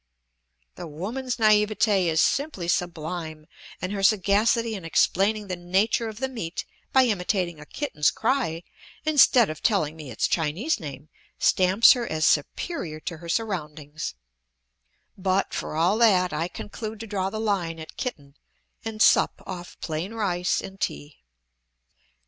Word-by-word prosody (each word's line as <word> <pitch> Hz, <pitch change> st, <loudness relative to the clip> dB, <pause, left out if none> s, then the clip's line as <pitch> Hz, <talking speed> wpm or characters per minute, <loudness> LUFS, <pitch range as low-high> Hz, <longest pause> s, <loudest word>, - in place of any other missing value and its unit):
The -, -, -6 dB
woman's 225 Hz, -, -4 dB
naivete 210 Hz, -3 st, +3 dB
is 160 Hz, -1 st, +1 dB
simply 275 Hz, -, 0 dB
sublime, 165 Hz, -2 st, -3 dB, 0.3 s
and 185 Hz, +2 st, -4 dB
her 200 Hz, -1 st, -3 dB
sagacity 215 Hz, +3 st, +3 dB
in 195 Hz, -4 st, -6 dB
explaining 200 Hz, +5 st, +2 dB
the 185 Hz, -2 st, -3 dB
nature 195 Hz, +6 st, 0 dB
of 215 Hz, -, -9 dB
the 265 Hz, -, 0 dB
meat 220 Hz, -9 st, -5 dB, 0.3 s
by 265 Hz, -, +6 dB
imitating 180 Hz, -6 st, -1 dB
a 150 Hz, -, -12 dB
kitten's 190 Hz, -, 0 dB
cry 225 Hz, -10 st, -1 dB, 0.4 s
instead 265 Hz, -6 st, +6 dB
of 155 Hz, -, -9 dB
telling 175 Hz, -9 st, +1 dB
me 155 Hz, -4 st, -9 dB
its 115 Hz, -, 0 dB
Chinese 175 Hz, -, 0 dB
name 145 Hz, -1 st, -8 dB, 0.3 s
stamps 190 Hz, +4 st, +5 dB
her 240 Hz, -2 st, +1 dB
as 155 Hz, 0 st, 0 dB
superior 155 Hz, -, 0 dB
to 170 Hz, -, -5 dB
her 170 Hz, +2 st, -10 dB
surroundings; 155 Hz, -, -3 dB, 1.0 s
but, 190 Hz, +1 st, 0 dB
for -, -, -4 dB
all 175 Hz, +7 st, +2 dB
that, 185 Hz, -7 st, +4 dB
I 160 Hz, +3 st, -1 dB
conclude 215 Hz, +4 st, -7 dB
to -, -, -5 dB
draw 195 Hz, -3 st, -2 dB
the 215 Hz, -, -5 dB
line 190 Hz, -7 st, -1 dB
at 160 Hz, 0 st, -10 dB
kitten 145 Hz, -, -5 dB, 0.5 s
and 220 Hz, -1 st, 0 dB
sup -, -, +4 dB
off 180 Hz, -2 st, -8 dB
plain 170 Hz, +7 st, -4 dB
rice 180 Hz, -5 st, 0 dB
and 195 Hz, 0 st, -10 dB
tea. 75 Hz, -2 st, -4 dB
185 Hz, 145 wpm, -25 LUFS, 160-220 Hz, 1.0 s, by